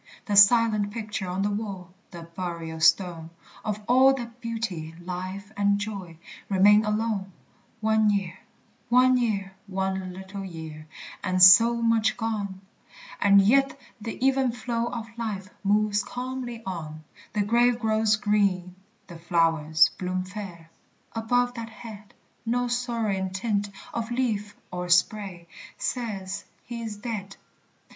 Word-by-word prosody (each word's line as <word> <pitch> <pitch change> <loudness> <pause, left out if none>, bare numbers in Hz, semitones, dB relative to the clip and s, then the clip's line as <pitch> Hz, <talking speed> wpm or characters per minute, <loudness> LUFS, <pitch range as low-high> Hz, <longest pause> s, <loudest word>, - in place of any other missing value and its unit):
The 205 -4 -1
silent 215 0 +6
picture 210 -3 -5
on 185 +2 -2
the 205 - 0
wall, 195 -4 -5 0.2
The 170 -2 -9
burial 170 -1 -6
stone, 165 0 +2 0.3
Of 210 -1 -3
all 260 +2 +6
that 240 -1 -8
beauty, 210 -9 -4
life, 185 +3 -6
and 200 0 +2
joy, 200 -5 -6 0.3
Remain 205 +2 +5
alone! 210 -2 -1 0.5
One 220 0 +3
year, 190 -3 -1 0.5
one 255 +1 +5
year, 205 -6 -1
one 190 -1 -2
little 190 +2 -8
year, 160 -4 -8 0.4
And 185 -1 0
so 230 +6 +8
much 225 -1 +2
gone! 205 -5 -3 0.6
And 200 -1 +6
yet 275 +6 +3 0.2
the 225 +1 -5
even 265 -2 +3
flow 235 0 -2
of 235 -2 -5
life 205 -4 -4
Moves 210 +1 +2
calmly 250 -1 -5
on. 155 -4 -6 0.3
The 210 -1 +1
grave 240 +3 +3
grows 220 -1 +2
green, 200 -4 +1 0.3
the 170 -3 -11
flowers 165 -2 +3
bloom 185 0 -2
fair, 185 -4 -9 0.4
Above 245 +2 +1
that 230 -2 -6
head; 215 -3 -11 0.3
No 245 +2 0
sorrowing 230 -6 -1
tint 205 +1 -1 0.2
of 230 -1 -3
leaf 220 -5 -1 0.2
or 180 0 -4
spray 180 -1 +1 0.3
Says 200 -6 -4 0.2
he 235 -1 -7
is 220 -2 -5
dead. 205 -4 -5
205 Hz, 130 wpm, -26 LUFS, 185-230 Hz, 0.6 s, so